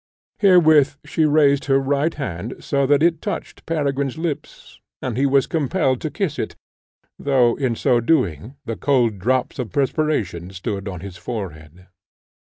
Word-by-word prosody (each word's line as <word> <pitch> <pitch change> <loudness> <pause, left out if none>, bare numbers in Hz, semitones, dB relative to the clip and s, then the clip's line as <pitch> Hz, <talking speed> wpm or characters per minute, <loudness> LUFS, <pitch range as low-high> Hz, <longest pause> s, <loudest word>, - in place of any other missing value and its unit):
Herewith 160 -8 +5
she 160 - +1
raised 145 -2 +3
her 135 -1 +3
right 140 +4 0
hand, 110 - -5
so 140 -1 0
that 145 +2 +3
it 165 -2 +2
touched - - -6
Peregrine's 140 -3 -1
lips, 160 -3 -6 0.2
and 125 -4 -4
he 135 +3 +2
was 135 0 +3
compelled 150 -4 0
to 155 - -2
kiss 175 -4 -3
it, - - -3 0.6
though, 130 -4 +3
in 130 -4 0
so 120 +1 +2
doing, 115 - 0
the 115 -2 -3
cold 120 -7 +1
drops 130 +6 0
of 120 -4 -4
perspiration 135 - -1
stood 95 +1 -5
on 90 -4 -6
his 95 -1 -8
forehead. 90 -7 -7
135 Hz, 155 wpm, -21 LUFS, 110-150 Hz, 0.6 s, Herewith